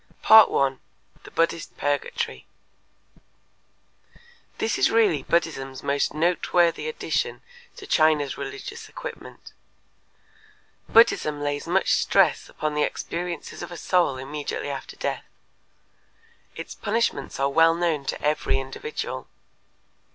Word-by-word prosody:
1. 140 - +6 0.5
The - - -10
Buddhist 165 0 -1
Purgatory 145 0 -2 2.1
This 220 - -1
is - - +4
really 205 -11 +3
Buddhism's 135 -5 -1
most 140 0 0
noteworthy 175 - +1
addition 470 0 -2 0.3
to 400 - -10
China's 155 - +2
religious 410 0 -7
equipment; - - -9 1.4
Buddhism 155 -10 +4
lays 145 0 -3
much - - +2
stress - - +2
upon 155 -1 -3
the 150 - 0
experiences 170 +3 -4
of 175 - -7
a 175 - -7
soul 175 -8 +1
immediately 145 +1 -4
after 135 -1 -7
death. - - -3 1.3
Its - - -7
punishments 230 -7 -2
are 140 0 +2
well 165 +3 +4
known 170 -4 0
to - - -3
every 150 -2 +1
individual. 135 - -6
160 Hz, 105 wpm, -24 LUFS, 145-180 Hz, 2.1 s, 1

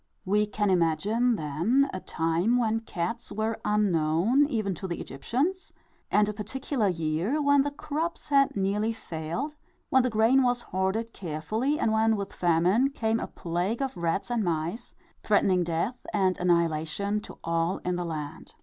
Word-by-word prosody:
We 210 +2 +2
can 210 -1 0
imagine, 205 +8 +2
then, 175 - +1
a 185 - -3
time 170 +8 0
when 225 -2 +1
cats 185 -2 -4
were 220 +1 -2
unknown 205 - +2
even 215 -8 -1
to 190 +3 -6
the 170 - -4
Egyptians, 285 - -2 0.4
and 210 0 +3
a 210 - -2
particular 220 +3 -2
year, 170 - 0
when 285 -1 +4
the 285 - 0
crops 310 +4 -4
had 275 -1 +3
nearly 205 +3 0
failed, 170 - -4 0.4
when 265 -2 +6
the 255 - +1
grain 225 +4 +4
was 245 -1 +1
hoarded 195 +5 -2
carefully, 215 - -2
and 220 - +1
when, 220 0 +3
with 200 -2 -5
famine, 180 +9 +3
came 225 -4 -1
a - - -4
plague 180 +9 -2
of 270 - -3
rats 170 +6 -1
and 235 -3 +1
mice, 170 +6 -3 0.3
threatening 190 -3 +3
death 170 +9 -2
and 190 -2 +2
annihilation 170 +4 +1
to - - -11
all 165 +2 0
in 180 0 0
the 175 - -2
land. 155 -2 -6
210 Hz, 160 wpm, -27 LUFS, 170-240 Hz, 0.4 s, when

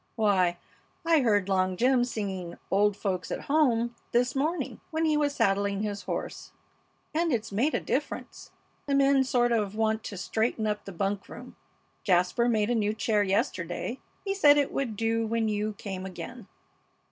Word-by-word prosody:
Why, 190 -6 +2 0.5
I 330 -1 +5
heard 205 -7 +2
Long 185 -1 +1
Jim 250 +3 +3
singing 190 -7 -4
'Old 205 +1 +3
Folks 185 -4 -2
at - - -3
Home' 240 -6 +2 0.2
this 245 +1 +2
morning 310 +6 -2
when 320 0 0
he 310 -1 +3
was 290 -1 +1
saddling 200 +1 +1
his 205 -1 -4
horse. - - -5 0.6
And 330 +1 +1
it's 225 -4 -1
made 245 +10 +1
a - - +1
difference. - - -4 0.4
The 280 - +1
men 275 -1 +4
sort 245 -2 +2
of 210 -3 0
want 220 0 0
to 200 - -6
straighten 220 +4 -1
up 210 -1 -2
the 195 - -7
bunk 195 +2 -2
room. 250 +1 -10 0.5
Jasper 180 +5 +2
made 220 -1 +1
a - - +3
new 215 -2 0
chair 215 -1 +1
yesterday. 190 +3 -1 0.3
He 390 - 0
said 295 -7 +6
it 285 -1 +1
would 250 -6 -2
do 225 +1 0
when 225 0 0
you 210 0 -1
came 190 -2 -6
again." 220 +4 -8
220 Hz, 170 wpm, -28 LUFS, 200-250 Hz, 0.6 s, said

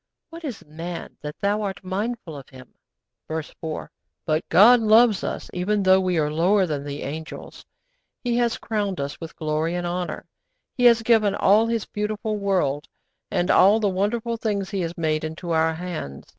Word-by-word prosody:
What 335 +1 -10
is 270 -8 -6
man, 165 +3 -7
that 150 0 -7
Thou 205 +1 +1
art 195 -2 -4
mindful 195 -2 -4
of 135 -2 -10
him?' 130 -2 -14 0.5
(Verse 160 -1 -5
4.) 160 -2 -5 0.3
But 155 -1 -1
God 235 +6 +7
loves 220 -2 +5
us - - -4
even 195 +3 0
though 190 0 +6
we 180 -2 0
are 150 -1 +1
lower 185 +5 +3
than 150 -4 -3
the 145 0 -6
angels. 155 +3 -7 0.6
He 240 -2 0
has 240 -1 +1
crowned 205 -4 -2
us 140 +3 -5
with 165 - -8
glory 155 +2 -1
and 175 0 -2
honour. 175 0 -3 0.5
He 245 - +1
has 235 -1 +6
given 220 -3 +3
all 210 +4 +4
His 230 -2 -1
beautiful 210 +1 -3
world, 185 -8 0 0.4
and 175 0 +1
all 200 +4 +6
the 210 -2 +1
wonderful 220 +5 -1
things 205 -4 -2
He 195 -2 -1
has 170 0 -4
made, 155 -2 0
into 160 +2 -5
our 160 0 +2
hands. 160 - -6
185 Hz, 180 wpm, -24 LUFS, 160-215 Hz, 0.6 s, God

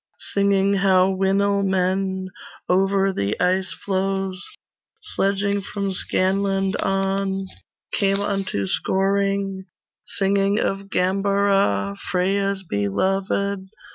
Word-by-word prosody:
Singing 200 0 +3
how 190 -1 +4
Winil 200 +1 +1
men 190 0 0 0.4
Over 195 +1 +2
the 100 - -1
icefloes 190 +1 -1 0.6
Sledging 200 +1 0
from 200 0 -3
Scanland 195 +1 0
on 195 0 0 0.5
Came 195 -1 +2
unto 195 - -1
Scoring; 195 - 0 0.5
Singing 200 +1 +2
of 195 0 -2
Gambara 195 - +1
Freya's 195 +1 0
beloved. 190 - -1
195 Hz, 80 wpm, -22 LUFS, 190-200 Hz, 0.6 s, how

